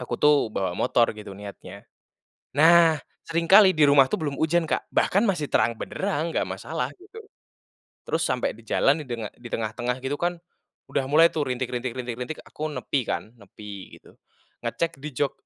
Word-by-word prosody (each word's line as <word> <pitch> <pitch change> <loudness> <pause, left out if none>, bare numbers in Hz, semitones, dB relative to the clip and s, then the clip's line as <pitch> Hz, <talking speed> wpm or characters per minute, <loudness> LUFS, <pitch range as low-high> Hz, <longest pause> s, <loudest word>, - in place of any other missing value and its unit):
aku 125 -1 -4
tuh 150 0 +7 0.2
bawa 95 -2 -1
motor 120 +2 +2
gitu 105 -2 -10
niatnya. 100 -1 -10 0.7
Nah 165 -1 +6 0.3
seringkali 185 +3 +5
di 150 - +6
rumah 140 -2 +6
tuh - - 0
belum 145 -2 -2
hujan 165 +1 +2
Kak, - - -2
bahkan 200 - +2
masih 180 -10 0
terang 115 -1 +2
benderang 170 -4 -3
nggak - - 0
masalah, - - -3
gitu. 400 +4 -13 0.9
Terus 165 - 0
sampai 125 -1 -1
di 115 - -16
jalan 140 +7 +2
didenga 120 -6 -5
di 120 - -11
tengah-tengah 115 +2 -2
gitu 135 +2 -1
kan 175 0 -1 0.5
udah 135 - 0
mulai 160 +3 +7
tuh 155 - 0
rintik 125 0 -2
rintik 125 0 -3
rintik 125 -2 -4
rintik 125 +5 -5
aku 155 +1 -5
nepi 140 0 -2
kan, 110 - -4
nepi 100 -1 -11
gitu. - - -20 0.5
Ngecek 170 -3 -2
di 150 - -4
jok, 140 +2 0
140 Hz, 175 wpm, -25 LUFS, 120-165 Hz, 0.9 s, tuh